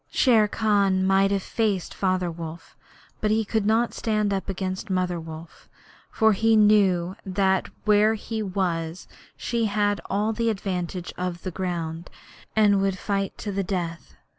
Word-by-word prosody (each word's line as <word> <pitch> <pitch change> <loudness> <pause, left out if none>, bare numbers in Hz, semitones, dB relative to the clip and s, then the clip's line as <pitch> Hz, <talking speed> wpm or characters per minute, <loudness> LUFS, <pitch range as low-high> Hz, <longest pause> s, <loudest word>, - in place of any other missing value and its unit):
Shere 225 -5 +4
Khan 200 -3 +2
might 195 +1 +4
have 195 -1 0
faced 210 -6 -1
Father 185 -2 0
Wolf, 165 0 -9 0.4
but 215 - 0
he 220 +1 +2
could 210 0 0
not 230 +2 +2
stand 215 -2 0
up 195 0 -3
against 190 +2 -4
Mother 180 -2 0
Wolf, 160 0 -11 0.4
for 220 -1 +4
he 225 +3 +3
knew 195 -4 +4
that 190 -1 +1 0.2
where 210 +1 +4
he 220 +1 -4
was 180 -4 -2 0.3
she 235 -2 -1
had 205 -1 0
all 210 +3 0
the 230 +1 0
advantage 185 -4 -3
of 180 -1 -3
the 185 - -3
ground, 170 -2 -4 0.5
and 205 -2 +4
would 195 -1 0
fight 195 0 -2
to 205 - -4
the 195 0 -1
death. 175 -3 -4
195 Hz, 155 wpm, -25 LUFS, 180-215 Hz, 0.5 s, Shere